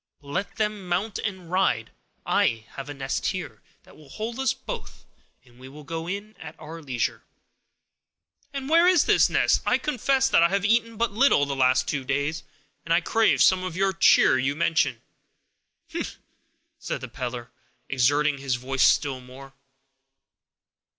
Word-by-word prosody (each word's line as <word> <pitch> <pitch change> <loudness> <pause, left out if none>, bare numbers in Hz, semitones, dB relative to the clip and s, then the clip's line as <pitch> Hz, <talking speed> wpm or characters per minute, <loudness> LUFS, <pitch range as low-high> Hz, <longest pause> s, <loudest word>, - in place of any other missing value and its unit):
But 145 - -19
let 185 +7 -3
them 210 -3 -2
mount 200 +4 -1
and 190 -5 -5
ride; 180 - +1 0.3
I 115 -1 +1
have 135 +1 -8
a - - -5
nest 135 -1 -3
here, - - -5 0.2
that - - -19
will 150 -3 -17
hold 230 - -5
us 265 - +2
both, - - -8 0.4
and 120 0 -22
we 130 +1 -11
will 150 +2 -12
go 165 +3 -5
in 200 +4 -6
at - - -10
our 165 +2 -9
leisure." 130 -5 -2 1.3
"And 275 -1 -5
where 335 +3 +5
is 360 -4 +4
this - - +4
nest? - - +2
I - - +2
confess 270 -1 +1
that 265 - +4
I 170 - +5
have 200 +1 0
eaten 230 +1 +1
but 230 -1 0
little 220 - +3
the 140 -1 -3
last 130 0 +2
two 140 -3 -2
days, 145 +4 -2 0.4
and 165 - -6
I 170 +1 +4
crave 225 +5 +3
some 185 -1 +4
of 185 -3 -5
the 195 0 +1
cheer 130 - +5
you 135 +3 0
mention." 155 -7 0 0.9
"Hem!" - - -3 0.7
said - - -4
the - - -6
peddler, 120 -1 -6 0.4
exerting 140 +3 +1
his 135 -2 -1
voice 130 +2 -3
still 135 -3 +1
more. 135 +2 -13
165 Hz, 170 wpm, -25 LUFS, 135-210 Hz, 1.3 s, where